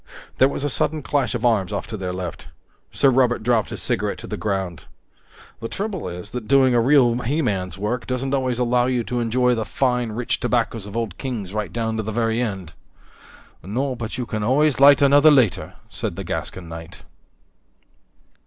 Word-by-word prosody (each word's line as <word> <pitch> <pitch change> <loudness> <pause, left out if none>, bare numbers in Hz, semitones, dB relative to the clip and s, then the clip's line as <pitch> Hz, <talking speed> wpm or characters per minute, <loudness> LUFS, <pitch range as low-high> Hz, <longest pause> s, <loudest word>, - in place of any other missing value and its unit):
There 130 - +7
was 140 - -4
a 145 - 0
sudden 155 +3 0
clash 135 -3 0
of 120 +1 -2
arms 105 -5 +2
off 100 - -3
to 110 - -4
their 95 -3 -4
left. 90 -2 -6 0.4
Sir 135 - +3
Robert 125 -3 +2
dropped 115 -2 +1
his - - -6
cigarette - - -1
to - - -9
the - - -4
ground. 95 -7 -3 0.7
"The 115 - -4
trouble 195 - -4
is 90 +3 -8
that 125 -3 -6
doing 135 -2 +4
a 120 - +4
real 130 -1 +4
he 145 +7 -1
man's 95 -6 -2
work 110 +5 -3
doesn't 130 +1 -2
always 130 -3 0
allow 125 0 +2
you 125 -2 0
to 125 +1 -3
enjoy 125 +2 +2
the 115 -2 -1
fine, 125 -1 -1
rich 120 +2 -2
tobaccos 115 -3 -1
of 105 +3 -6
Old 110 -6 -3
Kings 110 -8 -4
right 105 -1 -3
down 110 -1 -2
to - - 0
the 110 0 -4
very 115 +1 0
end." 95 -8 -4 0.9
"No, 130 - -2
but 115 -2 -5
you 125 - -2
can 110 -2 -4
always 135 +5 +2
light 140 +1 +7
another 145 +2 +6
later," 130 -9 +2
said - - -4
the - - -5
Gascon 90 -3 -5
knight. 80 0 -10
120 Hz, 195 wpm, -22 LUFS, 105-130 Hz, 0.9 s, There